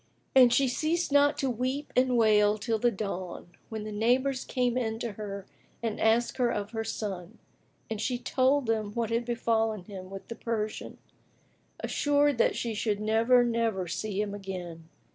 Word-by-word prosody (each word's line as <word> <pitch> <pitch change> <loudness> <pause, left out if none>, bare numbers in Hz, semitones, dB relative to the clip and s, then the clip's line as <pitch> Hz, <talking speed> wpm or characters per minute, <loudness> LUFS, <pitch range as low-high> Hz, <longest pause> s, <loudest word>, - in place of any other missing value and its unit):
And 255 -2 +7
she 270 +2 +4
ceased 315 +6 0
not 285 +1 +4
to 270 - 0
weep 255 +5 -3
and 255 -1 +3
wail 210 -2 +4
till 220 +1 -1
the 240 - +3
dawn, 190 -5 -5 0.2
when 220 -1 -5
the 215 - -6
neighbours 250 +5 +1
came 250 -2 0
in 225 -3 -1
to 230 0 -4
her 200 -1 -6 0.4
and 225 -2 -2
asked 230 +2 +2
her 245 -2 +2
of 205 -2 -3
her 225 -1 -2
son, 205 -2 -5 0.5
and 220 -1 -4
she 250 +2 0
told 260 +2 +2
them 215 -2 -1
what 230 -1 -2
had 230 +1 0
befallen 225 -3 0
him 185 -2 -9
with 195 0 -9
the - - -5
Persian, 220 -2 -4 0.8
assured 290 -3 +2
that - - +3
she 230 -2 -2
should 210 -1 -1
never, 225 +3 +4
never 230 -6 0
see 205 +3 -3
him 210 -1 -1
again. 180 -5 -7
225 Hz, 175 wpm, -29 LUFS, 210-245 Hz, 0.8 s, And